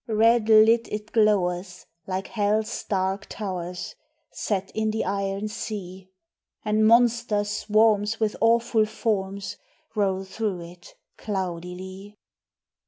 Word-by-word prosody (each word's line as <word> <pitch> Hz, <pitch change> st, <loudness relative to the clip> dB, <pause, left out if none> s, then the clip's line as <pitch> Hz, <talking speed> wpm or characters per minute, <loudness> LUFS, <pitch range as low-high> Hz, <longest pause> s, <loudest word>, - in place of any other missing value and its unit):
Red 225 Hz, 0 st, +3 dB
lit 225 Hz, +2 st, +6 dB
it 210 Hz, +1 st, -5 dB
glowers 180 Hz, -4 st, +1 dB, 0.2 s
like 190 Hz, 0 st, -2 dB
Hell's 215 Hz, 0 st, 0 dB
dark 190 Hz, 0 st, -1 dB
towers 180 Hz, -3 st, -5 dB, 0.4 s
Set 195 Hz, -2 st, -2 dB
in 220 Hz, 0 st, 0 dB
the 220 Hz, +1 st, -1 dB
iron 195 Hz, +1 st, -2 dB
sea; 190 Hz, -3 st, -6 dB, 0.6 s
And 215 Hz, 0 st, +3 dB
monster 235 Hz, -2 st, +4 dB
swarms 210 Hz, +1 st, +2 dB
with 220 Hz, -2 st, 0 dB
awful 230 Hz, -1 st, +3 dB
forms 200 Hz, -3 st, -2 dB, 0.4 s
Roll 195 Hz, -3 st, 0 dB
though 195 Hz, 0 st, -3 dB
it 175 Hz, +1 st, -12 dB, 0.2 s
cloudily. 190 Hz, +1 st, -5 dB
205 Hz, 105 wpm, -25 LUFS, 190-220 Hz, 0.6 s, lit